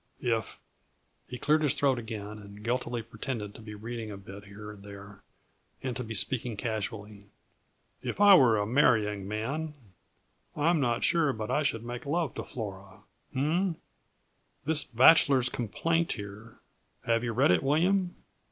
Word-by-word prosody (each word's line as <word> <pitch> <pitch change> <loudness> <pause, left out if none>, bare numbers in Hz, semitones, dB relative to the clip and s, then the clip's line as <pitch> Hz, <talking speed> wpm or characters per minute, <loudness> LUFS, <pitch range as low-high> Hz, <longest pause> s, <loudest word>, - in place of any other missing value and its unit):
If 115 -3 -2 0.3
" - - -43
He 125 - -5
cleared 155 +4 +2
his 145 -3 +3
throat 135 -3 +2
again 105 -2 -6
and 100 0 -12
guiltily 120 0 -2
pretended 110 -2 -5
to - - -12
be 105 -1 -9
reading 115 +1 -6
a 100 - -7
bit, 100 +1 -11
here 105 +1 -9
and 105 -2 -13
there, 100 0 -11 0.6
and 130 -2 -2
to 125 - -3
be 115 -1 -6
speaking 115 +1 -1
casually. 105 -2 -5 0.7
"If - - -4
I 205 -1 +8
were 125 - +6
a 105 - 0
marrying 105 -5 +2
man, 140 +9 -3 0.8
I 150 +3 +3
am 170 - +2
not 120 -4 0
sure 160 -5 +3
but 110 -2 -4
I 150 - +2
should 115 -6 -1
make 120 +3 -6
love 160 -2 0
to - - -5
Flora 100 -4 -8 0.3
h - - -9
m 140 +3 +1 0.2
m! 170 - -3 0.9
this 155 -1 +3
'Bachelor's 130 0 +6
Complaint' 165 +10 -1
here 105 +2 -9 0.5
have 115 0 +2
you 120 - -1
read 120 -2 +3
it, 90 - +3
William? 175 +6 +2
115 Hz, 170 wpm, -29 LUFS, 105-140 Hz, 0.9 s, I